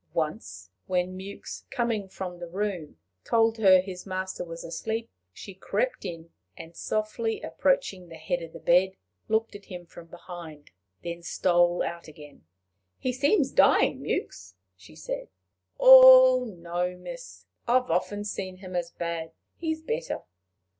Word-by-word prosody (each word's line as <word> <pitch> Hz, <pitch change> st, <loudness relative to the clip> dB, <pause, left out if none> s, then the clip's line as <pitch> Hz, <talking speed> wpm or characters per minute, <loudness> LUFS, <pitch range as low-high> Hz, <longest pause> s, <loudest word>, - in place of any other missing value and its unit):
Once 95 Hz, -, -4 dB, 0.2 s
when 180 Hz, 0 st, -1 dB
Mewks, 195 Hz, +2 st, -8 dB
coming 230 Hz, -6 st, -2 dB
from 180 Hz, -2 st, -7 dB
the 175 Hz, -, -6 dB
room, 180 Hz, -, -4 dB, 0.3 s
told 225 Hz, -1 st, +2 dB
her 190 Hz, -3 st, +7 dB
his 180 Hz, -1 st, -6 dB
master 185 Hz, -1 st, -4 dB
was 165 Hz, -1 st, -8 dB
asleep, 220 Hz, +8 st, -4 dB, 0.2 s
she 195 Hz, -, -10 dB
crept -, -, -2 dB
in, 165 Hz, -1 st, -7 dB, 0.3 s
and, 165 Hz, +1 st, -11 dB
softly 215 Hz, +3 st, -2 dB
approaching 345 Hz, -, 0 dB
the 165 Hz, -, -10 dB
head 170 Hz, +2 st, -3 dB
of 165 Hz, -1 st, -8 dB
the -, -, -10 dB
bed, 185 Hz, +2 st, +3 dB, 0.3 s
looked 220 Hz, +1 st, 0 dB
at 200 Hz, -, -11 dB
him 180 Hz, -2 st, -9 dB
from 170 Hz, 0 st, -13 dB
behind, 170 Hz, -3 st, -11 dB, 0.3 s
then 170 Hz, 0 st, -5 dB
stole 175 Hz, 0 st, +2 dB
out 170 Hz, 0 st, -5 dB
again. 150 Hz, -, -14 dB, 0.5 s
"He 255 Hz, -, -2 dB
seems 285 Hz, -, +2 dB
dying, -, -, +4 dB
Mewks," 95 Hz, +1 st, -4 dB, 0.2 s
she 90 Hz, -4 st, -17 dB
said. 80 Hz, -, -5 dB, 0.5 s
"Oh, 255 Hz, -1 st, +9 dB
no, 180 Hz, -2 st, -4 dB
miss! -, -, -10 dB, 0.2 s
I've 250 Hz, -2 st, +2 dB
often 205 Hz, +4 st, -1 dB
seen 190 Hz, -3 st, -5 dB
him 185 Hz, -1 st, -9 dB
as 175 Hz, -1 st, -1 dB
bad. 165 Hz, -1 st, -5 dB, 0.2 s
He's 320 Hz, -1 st, -3 dB
better." 485 Hz, +7 st, -3 dB
185 Hz, 145 wpm, -27 LUFS, 170-225 Hz, 0.5 s, Oh